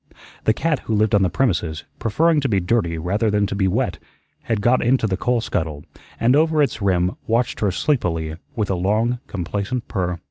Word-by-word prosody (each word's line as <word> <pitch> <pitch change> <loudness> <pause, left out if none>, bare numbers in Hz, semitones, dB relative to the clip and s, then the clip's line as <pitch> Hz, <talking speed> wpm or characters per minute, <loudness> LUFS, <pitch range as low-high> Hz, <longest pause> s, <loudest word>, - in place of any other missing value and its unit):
The 110 - +4
cat 160 -4 0
who 110 - -2
lived 105 0 +2
on 105 - +5
the 95 - +3
premises, 85 - 0 0.2
preferring 155 +9 +2
to 135 - 0
be 100 -3 +2
dirty 90 -3 0
rather 100 +7 0
than 105 0 +2
to 100 - -4
be 100 -1 +1
wet, 90 - -1 0.5
had 115 -2 0
got 120 +5 +3
into 125 0 +2
the 95 -3 0
coal 120 +4 0
scuttle, 80 -8 -3 0.4
and 125 +3 +4
over 155 0 +3
its 115 -5 -2
rim 90 -2 +2 0.2
watched 115 +2 0
her 105 - +2
sleepily 85 - -1 0.2
with 105 -3 -1
a - - +1
long, 110 +7 +1
complacent 100 +6 -3
purr. 90 -4 -2
105 Hz, 200 wpm, -21 LUFS, 90-120 Hz, 0.5 s, on